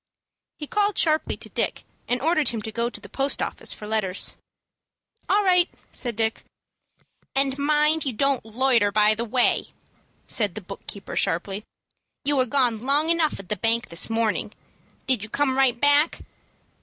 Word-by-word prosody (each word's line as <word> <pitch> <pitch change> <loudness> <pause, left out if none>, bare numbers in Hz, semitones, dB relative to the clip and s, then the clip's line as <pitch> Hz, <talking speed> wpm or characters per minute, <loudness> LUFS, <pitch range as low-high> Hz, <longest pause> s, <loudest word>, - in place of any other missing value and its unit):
He 300 - -6
called 410 +4 0
sharply 310 -1 +2
to - - -7
Dick, - - -1 0.2
and 245 +1 -1
ordered 310 -4 +3
him 230 - -3
to 220 - -5
go 235 +2 -1
to - - -7
the - - -11
post 275 +1 -1
office - - -3
for 210 - -2
letters. 210 -3 -1 1.0
"All 415 +1 +3
right," 360 -2 +4 0.2
said 240 -3 -4
Dick. 225 0 -1 0.9
"And 270 -1 +3
mind 300 +2 +3
you 270 - 0
don't 275 +3 +1
loiter 230 -2 +2
by 210 +1 +4
the 230 +2 -3
way," 245 +2 +2 0.6
said 205 -6 +1
the 215 - -5
book 195 +1 -11
keeper, 200 -2 -6
sharply. 195 +5 -1 0.6
"You 290 +1 +2
were 255 -1 +3
gone 240 -4 +1
long 290 +4 +2
enough 330 -2 +2
at 195 - -11
the 210 - 0
bank 230 +4 +1
this 170 +5 -1
morning. 225 -1 -1 0.5
Did 260 -5 +2
you 215 - -7
come 275 +1 0
right 260 -3 +2
back?" 290 +3 +3
250 Hz, 170 wpm, -24 LUFS, 215-290 Hz, 1.0 s, right